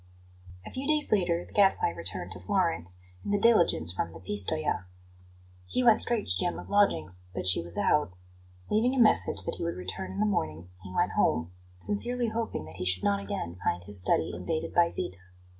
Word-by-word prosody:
A - - -8
few 265 +2 -5
days 305 -1 +1
later 175 -4 +1
the - - -18
Gadfly 195 - +4
returned 85 +1 -5
to 95 - -5
Florence 90 - -1 0.3
in - - -5
the 205 - +2
diligence 175 - +3
from 85 -2 -2
Pistoja. 105 - -1 0.8
He 255 - 0
went 230 -2 +6
straight 235 -3 +1
to 90 - +1
Gemma's 175 - -1
lodgings, 95 - +1
but - - -3
she 90 -2 +4
was 85 0 -5
out. 150 -10 +2 0.6
Leaving 240 +5 +2
a - - 0
message 225 -3 +4
that - - -4
he - - -3
would 170 - -2
return 95 +1 -5
in 95 - -5
the 105 - +3
morning 85 -4 -2
he 95 -1 -10
went - - +1
home, 80 +2 +1 0.3
sincerely 235 - 0
hoping 225 - -3
that 80 - -12
he - - -4
should 90 0 +2
not 100 0 +2
again 90 -2 -5
find 90 +1 0
his 100 0 +1
study 80 - +1
invaded 90 - -3
by 170 -1 +4
Zita. 95 - -3
100 Hz, 190 wpm, -29 LUFS, -, 0.8 s, went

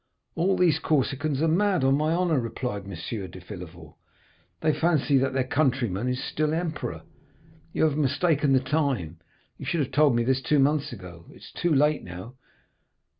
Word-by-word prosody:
"'All 185 +3 +1
these 165 -4 +3
Corsicans 145 -1 0
are - - +3
mad, 185 0 +2
on 135 +1 +4
my 155 +2 +1
honor,' 170 -4 +2
replied 115 -3 -4
M. 95 +3 -5
de 95 - -10
Villefort; 90 -4 -10 0.7
'they 155 -1 +2
fancy 155 -5 +2
that 135 0 0
their 130 -1 +1
countryman 125 -6 0
is 125 0 -1
still 155 +1 -1
emperor. 165 -3 -4 0.7
You - - 0
have 155 -2 +2
mistaken 145 0 +2
the 130 - +5
time, 130 - -1 0.4
you - - -7
should 170 - 0
have 135 - -2
told 145 -2 +4
me 120 - +2
this 130 +2 +1
two 150 +3 +1
months 145 +1 +2
ago, 90 -6 -10
it - - -15
is - - -12
too 175 - -1
late 150 +2 +2
now. 90 +6 -9
135 Hz, 175 wpm, -26 LUFS, 115-155 Hz, 0.7 s, the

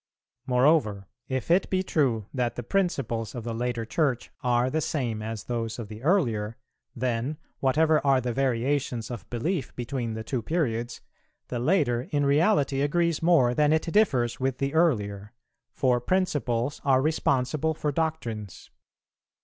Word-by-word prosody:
Moreover, 125 -6 +3 0.2
if 130 +3 -2
it 180 +3 +3
be 185 -1 +1
true 125 - +1
that 125 -3 -1
the 120 - -5
principles 120 - -1
of 120 - -5
the 115 0 -4
later 120 0 -2
Church 130 -1 -1
are 125 0 +2
the 155 +5 0
same 120 -9 -2
as 110 -1 -5
those 115 -2 -3
of 115 -4 -7
the 110 0 -9
earlier, 115 - +1 0.4
then, 125 +3 -1 0.2
whatever 155 +4 +3
are 135 -2 +4
the 125 -1 -2
variations 130 -2 -1
of 115 -7 -7
belief 140 +7 -2
between 120 -2 -3
the 110 - -5
two 125 +2 -2
periods, 120 -4 -2 0.5
the 120 - -2
later 125 -4 +1
in 145 -1 +1
reality 145 -2 +3
agrees 170 +2 +1
more 160 -8 +4
than 150 +2 +3
it 160 +2 +1
differs 130 - +2
with 130 -1 -1
the 140 +1 -2
earlier, 105 -10 +1 0.4
for 125 -2 +1
principles 145 -6 0
are 135 -2 +4
responsible 155 +1 +1
for 150 0 -1
doctrines. 125 - -4
130 Hz, 150 wpm, -27 LUFS, 115-155 Hz, 0.5 s, are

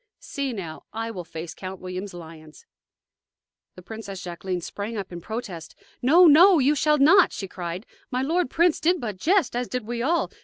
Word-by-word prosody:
See, 280 -2 -4
now: 170 -8 -7
I 225 +1 -4
will 185 -5 -6
face 165 0 -8
Count 185 0 -8
William's 185 +1 -6
lions!" 160 -3 -12 1.1
The 180 - -12
Princess 200 -2 -8
Jacqueline 180 +1 -4
sprang 210 +6 -5
up 195 -2 -5
in 175 -1 -7
protest. 195 -5 -7 0.3
"No, 330 +9 +6
no; 345 +4 +7
you 285 +1 +3
shall 300 +1 +2
not!" 305 +8 +6
she 195 - -6
cried. 180 +2 -6 0.2
"My 255 0 -1
lord 330 +1 0
prince 340 +2 +2
did 350 +3 +2
but 215 -7 -5
jest, 330 - +1
as 245 0 -1
did 250 -3 -4
we 235 +1 -4
all. 330 +7 0
225 Hz, 185 wpm, -24 LUFS, 180-285 Hz, 1.1 s, no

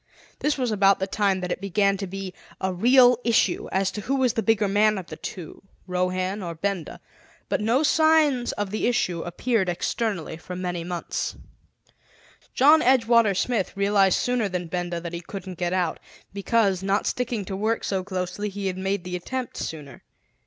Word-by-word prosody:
This 295 -1 0
was 250 -3 -1
about 200 -1 +4
the 190 - -1
time 195 -1 0
that 180 0 -3
it - - -3
began 200 0 +2
to 195 0 -4
be 190 0 -6 0.3
a 190 0 -1
real 245 +5 +5
issue 225 -5 +1
as 190 0 +1
to 210 - -5
who 270 +7 -1
was 260 -3 +2
the 230 - 0
bigger 220 -2 +2
man 210 +1 +3
of 185 - -5
the - - -8
two, 175 -5 -8 0.2
Rohan 185 +2 -1
or 170 -2 -5
Benda. 190 0 -3 0.5
But - - 0
no 235 +7 +2
signs 305 -5 +3
of 205 -2 -3
the 215 - 0
issue 210 -9 0
appeared 190 +3 -1
externally 175 -2 -2
for 180 +2 -8
many 180 -2 -3
months. 175 0 -3 1.2
John 300 +4 +6
Edgewater 230 -5 +4
Smith 205 -6 -1
realized 200 -1 +3
sooner 245 -4 0
than 180 -1 -3
Benda 175 0 -3
that 170 0 -7
he 170 - -4
couldn't 185 -1 -8
get 175 -1 -1
out, 180 -3 0 0.3
because, 200 -2 +1
not 195 +1 0
sticking 235 -5 -2
to 190 - -5
work 220 +3 -1
so 190 -2 -1
closely, 185 +2 -3
he 200 0 -6
had 185 -1 -2
made 195 -1 -1
the 180 0 -5
attempt 250 +8 -4
sooner. 145 -5 -6
195 Hz, 180 wpm, -25 LUFS, 180-230 Hz, 1.2 s, John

